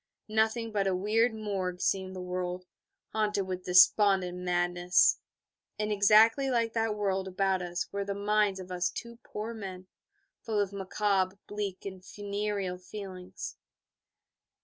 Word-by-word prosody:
Nothing 220 Hz, +1 st, +1 dB
but 200 Hz, -2 st, 0 dB
a 190 Hz, -, +1 dB
weird 220 Hz, +5 st, +2 dB
morgue 195 Hz, -4 st, -3 dB
seemed 190 Hz, 0 st, -1 dB
the 185 Hz, -, -5 dB
world, 180 Hz, 0 st, -3 dB, 0.5 s
haunted 210 Hz, -2 st, 0 dB
with 185 Hz, 0 st, -5 dB
despondent 180 Hz, 0 st, +5 dB
madness; 175 Hz, 0 st, +3 dB, 0.6 s
and 210 Hz, 0 st, -1 dB
exactly 220 Hz, +6 st, +5 dB
like 230 Hz, -3 st, +1 dB
that 225 Hz, -2 st, 0 dB
world 195 Hz, -2 st, -1 dB
about 190 Hz, 0 st, 0 dB
us 175 Hz, 0 st, -3 dB
were 200 Hz, 0 st, -2 dB
the 200 Hz, 0 st, -3 dB
minds 205 Hz, -1 st, +1 dB
of 185 Hz, 0 st, -9 dB
us 180 Hz, 0 st, 0 dB
two 235 Hz, -1 st, -8 dB
poor 215 Hz, +2 st, -5 dB
men, 190 Hz, -4 st, -7 dB, 0.6 s
full 220 Hz, -2 st, -1 dB
of 200 Hz, -1 st, 0 dB
macabre, 195 Hz, 0 st, 0 dB
bleak, 205 Hz, -2 st, -5 dB
and 190 Hz, -2 st, -7 dB
funereal 200 Hz, -2 st, -3 dB
feelings. 185 Hz, -1 st, -8 dB
195 Hz, 140 wpm, -30 LUFS, 185-210 Hz, 0.6 s, despondent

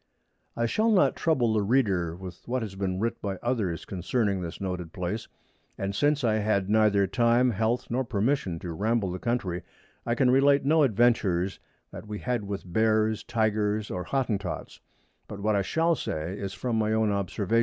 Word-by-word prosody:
I 115 Hz, -, +1 dB
Shall 215 Hz, -, +1 dB
not 205 Hz, -4 st, +4 dB
trouble 125 Hz, -9 st, +1 dB
the 110 Hz, -, +2 dB
Reader 100 Hz, -7 st, +1 dB
with 90 Hz, -1 st, -9 dB
what 125 Hz, 0 st, -1 dB
has 105 Hz, -3 st, -6 dB
been 95 Hz, -1 st, -2 dB
writ 115 Hz, +3 st, -2 dB
by 100 Hz, -2 st, -2 dB
others 110 Hz, -9 st, -1 dB
concerning 100 Hz, +1 st, -1 dB
this 85 Hz, -1 st, -6 dB
noted 90 Hz, -3 st, -4 dB
Place: 95 Hz, +3 st, -3 dB, 0.5 s
And 100 Hz, 0 st, -2 dB
since 145 Hz, +6 st, +1 dB
I 110 Hz, -2 st, +2 dB
had 105 Hz, -2 st, 0 dB
neither 105 Hz, -2 st, +4 dB
Time, 120 Hz, +4 st, +3 dB
Health, 115 Hz, +3 st, 0 dB
nor 130 Hz, +2 st, +1 dB
Permission 115 Hz, -4 st, 0 dB
to 85 Hz, -2 st, -5 dB
ramble 105 Hz, +1 st, 0 dB
the 90 Hz, -, -5 dB
Country, 95 Hz, -7 st, -1 dB, 0.4 s
I 120 Hz, -, 0 dB
can 125 Hz, +1 st, +3 dB
relate 140 Hz, +1 st, +4 dB
no 155 Hz, +2 st, +4 dB
Adventures 105 Hz, -7 st, +2 dB, 0.3 s
that -, -, -9 dB
we 105 Hz, 0 st, -5 dB
had 120 Hz, -2 st, -2 dB
with 100 Hz, -1 st, -4 dB
Bears, 110 Hz, +3 st, +1 dB
Tygers 110 Hz, -2 st, 0 dB
or 90 Hz, -1 st, -4 dB
Hottentots; 105 Hz, -9 st, -2 dB, 0.5 s
but 100 Hz, -, -8 dB
what 105 Hz, +1 st, +1 dB
I 100 Hz, -, +2 dB
shall 165 Hz, -, +1 dB
say 80 Hz, -, -3 dB
is 100 Hz, -2 st, -5 dB
from 120 Hz, -3 st, -1 dB
my 110 Hz, 0 st, +1 dB
own 110 Hz, -1 st, +2 dB
Observation. 100 Hz, +2 st, 0 dB
110 Hz, 180 wpm, -27 LUFS, 95-120 Hz, 0.5 s, not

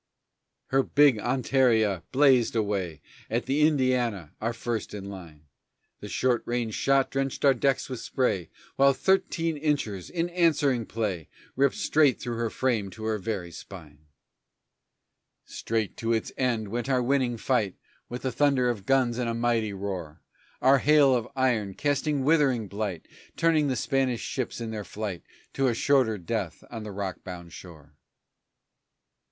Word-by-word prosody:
Her 135 Hz, +1 st, +4 dB
big 140 Hz, -4 st, +4 dB
Hontaria 115 Hz, -6 st, +2 dB
blazed 130 Hz, -4 st, +4 dB
away 95 Hz, -8 st, -1 dB, 0.3 s
At 120 Hz, +2 st, -1 dB
the 145 Hz, +4 st, +3 dB
Indiana, 125 Hz, -, 0 dB
our 115 Hz, +2 st, 0 dB
first 115 Hz, -2 st, -4 dB
in 100 Hz, -1 st, -7 dB
line. 80 Hz, -6 st, -11 dB, 0.5 s
The -, -, -8 dB
short 125 Hz, -2 st, +1 dB
ranged 120 Hz, -2 st, -2 dB
shot 135 Hz, -1 st, +2 dB
drenched 135 Hz, +1 st, -2 dB
our 140 Hz, -, +7 dB
decks 135 Hz, +2 st, 0 dB
with 130 Hz, -3 st, -5 dB
spray 95 Hz, -10 st, -1 dB, 0.3 s
While 140 Hz, -, +5 dB
our 140 Hz, -, +5 dB
thirteen 185 Hz, -4 st, +1 dB
inchers, 140 Hz, -, -2 dB
in 170 Hz, 0 st, -2 dB
answering 150 Hz, -9 st, +2 dB
play, 100 Hz, -8 st, -3 dB, 0.3 s
Ripped 140 Hz, 0 st, +2 dB
straight 150 Hz, -4 st, +3 dB
through 120 Hz, -1 st, -4 dB
her 115 Hz, -1 st, -1 dB
frame 115 Hz, -7 st, -1 dB
to 110 Hz, +3 st, -10 dB
her 110 Hz, -1 st, -1 dB
very 95 Hz, -4 st, -4 dB
spine! 75 Hz, -5 st, -12 dB, 1.4 s
Straight 110 Hz, -3 st, -3 dB
to 115 Hz, 0 st, 0 dB
its 110 Hz, -, -1 dB
end 115 Hz, -5 st, -1 dB
went 120 Hz, +4 st, -3 dB
our 130 Hz, -2 st, +2 dB
winning 125 Hz, -2 st, +1 dB
fight 110 Hz, -6 st, 0 dB, 0.3 s
With 125 Hz, +1 st, -6 dB
the 130 Hz, -, -1 dB
thunder 135 Hz, -1 st, +2 dB
of 105 Hz, -5 st, -4 dB
guns 130 Hz, -3 st, +2 dB
in 125 Hz, -, -1 dB
a 115 Hz, -, -1 dB
mighty 115 Hz, -2 st, 0 dB
roar. 95 Hz, -5 st, -6 dB, 0.4 s
Our 135 Hz, +1 st, +6 dB
hail 145 Hz, -1 st, +5 dB
of 120 Hz, -2 st, 0 dB
iron, 115 Hz, -7 st, 0 dB
casting 145 Hz, -1 st, 0 dB
withering 135 Hz, -7 st, +2 dB
blight, 100 Hz, -4 st, -4 dB, 0.3 s
Turning 160 Hz, -3 st, +3 dB
the 130 Hz, -, 0 dB
Spanish 130 Hz, -3 st, 0 dB
ships 130 Hz, -2 st, -4 dB
in 115 Hz, -1 st, -4 dB
their 105 Hz, -2 st, -4 dB
flight 100 Hz, -2 st, -5 dB, 0.3 s
To 135 Hz, -1 st, +1 dB
a 120 Hz, -, +1 dB
shorter 125 Hz, -4 st, +2 dB
death 95 Hz, -2 st, -4 dB
on 115 Hz, -2 st, -6 dB
the 105 Hz, -1 st, -7 dB
rock 95 Hz, -2 st, -5 dB
bound 85 Hz, -3 st, -9 dB
shore. 75 Hz, -5 st, -13 dB
120 Hz, 160 wpm, -27 LUFS, 105-135 Hz, 1.4 s, our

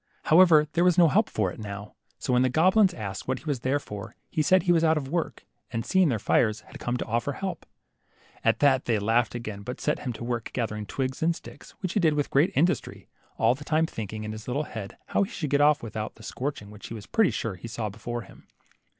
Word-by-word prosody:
However, 160 Hz, -2 st, +6 dB
there 170 Hz, +1 st, +3 dB
was 180 Hz, -1 st, +4 dB
no 170 Hz, -2 st, +7 dB
help -, -, +3 dB
for 100 Hz, -4 st, 0 dB
it -, -, -11 dB
now, 105 Hz, -1 st, -7 dB, 0.2 s
so 130 Hz, -, -2 dB
when 125 Hz, -, +4 dB
the 130 Hz, -, +3 dB
goblins 185 Hz, -, +4 dB
asked 100 Hz, -, -6 dB
what 130 Hz, -, 0 dB
he -, -, -14 dB
was 145 Hz, -5 st, -1 dB
there 130 Hz, +4 st, +1 dB
for, 105 Hz, -8 st, -8 dB, 0.2 s
he 155 Hz, -, +1 dB
said 185 Hz, +3 st, +4 dB
he 180 Hz, -, +3 dB
was 165 Hz, -1 st, +4 dB
out 160 Hz, -1 st, +4 dB
of 135 Hz, -3 st, -3 dB
work, 170 Hz, +1 st, -3 dB, 0.2 s
and 115 Hz, -1 st, -3 dB
seeing 185 Hz, -3 st, +3 dB
their 120 Hz, -, +1 dB
fires, 110 Hz, +1 st, +2 dB
had -, -, -13 dB
come 120 Hz, +1 st, -1 dB
to -, -, -3 dB
offer 120 Hz, +5 st, -1 dB
help. 185 Hz, -2 st, -5 dB, 0.8 s
At -, -, +2 dB
that 135 Hz, -2 st, +4 dB
they 115 Hz, -3 st, +2 dB
laughed 115 Hz, +3 st, +1 dB
again, 110 Hz, -4 st, -5 dB
but 125 Hz, +5 st, -6 dB
set 150 Hz, -, 0 dB
him 125 Hz, -, -3 dB
to 115 Hz, -, -8 dB
work 120 Hz, -1 st, -3 dB
gathering 105 Hz, -4 st, -3 dB
twigs 130 Hz, +2 st, -3 dB
and 165 Hz, +1 st, +2 dB
sticks, -, -, -13 dB
which 185 Hz, -2 st, -2 dB
he -, -, +2 dB
did 160 Hz, -5 st, +3 dB
with 145 Hz, -1 st, -1 dB
great 145 Hz, +6 st, +4 dB
industry, 170 Hz, +7 st, 0 dB, 0.3 s
all -, -, +4 dB
the 140 Hz, +3 st, -9 dB
time 155 Hz, +1 st, +2 dB
thinking 110 Hz, -6 st, -6 dB
in 110 Hz, -, -4 dB
his 110 Hz, 0 st, -8 dB
little 135 Hz, +4 st, -1 dB
head 110 Hz, -8 st, -7 dB
how -, -, +2 dB
he 200 Hz, -, 0 dB
should 155 Hz, -, -4 dB
get 145 Hz, 0 st, +3 dB
off 150 Hz, -2 st, +4 dB
without 110 Hz, -1 st, -5 dB
the 110 Hz, -, -15 dB
scorching 125 Hz, -6 st, -5 dB
which 105 Hz, -1 st, -10 dB
he 115 Hz, -, -7 dB
was 105 Hz, -, -8 dB
pretty 220 Hz, -6 st, +3 dB
sure 115 Hz, -, -3 dB
he 90 Hz, +5 st, -9 dB
saw 115 Hz, -1 st, -3 dB
before 115 Hz, +3 st, -5 dB
him. -, -, -17 dB
130 Hz, 250 wpm, -27 LUFS, 110-160 Hz, 0.8 s, no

